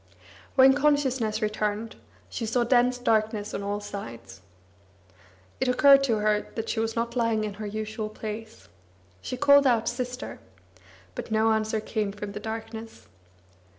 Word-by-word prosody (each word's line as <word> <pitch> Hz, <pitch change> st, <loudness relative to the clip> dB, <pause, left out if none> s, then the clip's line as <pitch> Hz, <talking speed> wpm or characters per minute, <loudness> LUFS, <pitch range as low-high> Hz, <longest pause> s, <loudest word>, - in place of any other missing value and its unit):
When 265 Hz, 0 st, +7 dB
consciousness 265 Hz, -7 st, +1 dB
returned, 215 Hz, +1 st, -2 dB, 0.3 s
she 230 Hz, -, -4 dB
saw 240 Hz, +2 st, +1 dB
dense 245 Hz, +1 st, +3 dB
darkness 215 Hz, -3 st, 0 dB
on -, -, -3 dB
all 200 Hz, +1 st, -2 dB
sides. 115 Hz, -, -8 dB, 1.2 s
It 260 Hz, -, 0 dB
occurred 275 Hz, +2 st, +6 dB
to 230 Hz, -5 st, +1 dB
her 210 Hz, 0 st, +1 dB
that 225 Hz, -1 st, -4 dB
she 225 Hz, -, -1 dB
was 225 Hz, 0 st, -1 dB
not 235 Hz, +1 st, -2 dB
lying 230 Hz, -3 st, +1 dB
in 210 Hz, -1 st, -3 dB
her 210 Hz, -, -3 dB
usual 215 Hz, +1 st, -4 dB
place. 215 Hz, +1 st, -8 dB, 0.5 s
She 255 Hz, -, -5 dB
called 285 Hz, 0 st, +6 dB
out 230 Hz, -3 st, +2 dB
"Sister," 250 Hz, +1 st, -4 dB, 0.7 s
but -, -, -6 dB
no 220 Hz, 0 st, +3 dB
answer 220 Hz, 0 st, 0 dB
came 215 Hz, -1 st, -2 dB
from 205 Hz, 0 st, -7 dB
the 205 Hz, -, -6 dB
darkness. 225 Hz, +1 st, -7 dB
220 Hz, 150 wpm, -26 LUFS, 215-245 Hz, 1.2 s, When